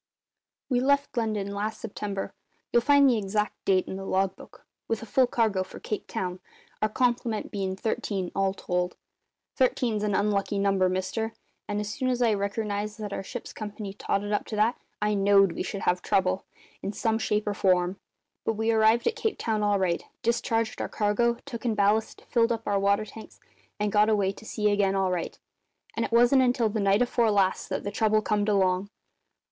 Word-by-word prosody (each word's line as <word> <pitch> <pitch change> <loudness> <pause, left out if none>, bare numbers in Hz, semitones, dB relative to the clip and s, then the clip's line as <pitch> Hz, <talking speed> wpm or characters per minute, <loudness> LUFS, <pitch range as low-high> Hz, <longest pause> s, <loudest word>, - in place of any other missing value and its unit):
"We 250 -2 +1
left 280 +2 +1
London 215 -4 -1
last 210 +2 -3
September 200 -2 -5 0.4
you'll 235 - +5
find 280 +2 +5
the 240 -4 +3
exact 210 +1 -2
date 190 -1 +3
in 190 - -5
the 195 - -6
log 190 0 0
book - - -15 0.2
with 225 0 -2
a - - -6
full 255 +3 +3
cargo 220 -6 +1
for - - -11
Cape 210 - -4
Town, 180 -1 -3 0.4
our 215 - +2
complement 240 -1 0
bein' 190 -2 -2
thirteen, 195 -3 -2
all 195 0 0
told. 180 -1 -2 0.6
Thirteen's 245 -4 +1
an 210 -2 0
unlucky 200 0 +1
number, 195 -2 +2
mister; 190 +5 -2 0.3
and 205 - -2
as 210 0 -3
soon 260 +2 -1
as 250 -1 0
I 235 -3 +3
reckernised 205 +1 -2
that 210 -2 -5
our - - -3
ship's 240 +5 -7
company 210 -2 -6
totted 205 0 -2
up 205 - -1
to 215 - -4
that 215 +3 +2 0.3
I 210 0 +2
knowed 195 -1 +4
we - - -4
should 195 +1 -4
have 180 0 +1
trouble, 185 0 +1 0.4
in 195 - -3
some 225 0 0
shape 210 -1 0
or 205 - -1
form. 185 -1 +1 0.4
But 225 - 0
we 220 +1 0
arrived 220 +1 +4
at 465 - +1
Cape 440 -2 -1
Town 220 -2 -1
all 205 -1 +2
right; 180 -3 0 0.2
discharged 230 -1 0
our - - -3
cargo; 235 +3 +1
took 245 -5 -7
in 230 -3 0
ballast; 210 +2 +1
filled 235 -1 +2
up 225 -1 -2
our 200 -1 +1
water 200 +2 +2
tanks, 220 +1 -12 0.4
and 210 0 0
got 210 +1 +4
away 200 -3 +2
to 200 - -14
sea 210 -1 0
again 200 -1 +2
all 190 -1 +1
right; 175 -2 -3 0.6
and 230 - 0
it - - -3
wasn't 245 +3 +5
until 245 -3 +2
the 215 +1 -2
night 200 +3 +3
afore 240 -2 +2
last 195 -2 +1
that - - -2
the 200 - -3
trouble 215 0 +2
comed 210 -1 +1
along. 190 -1 +2
210 Hz, 195 wpm, -27 LUFS, 195-225 Hz, 0.6 s, you'll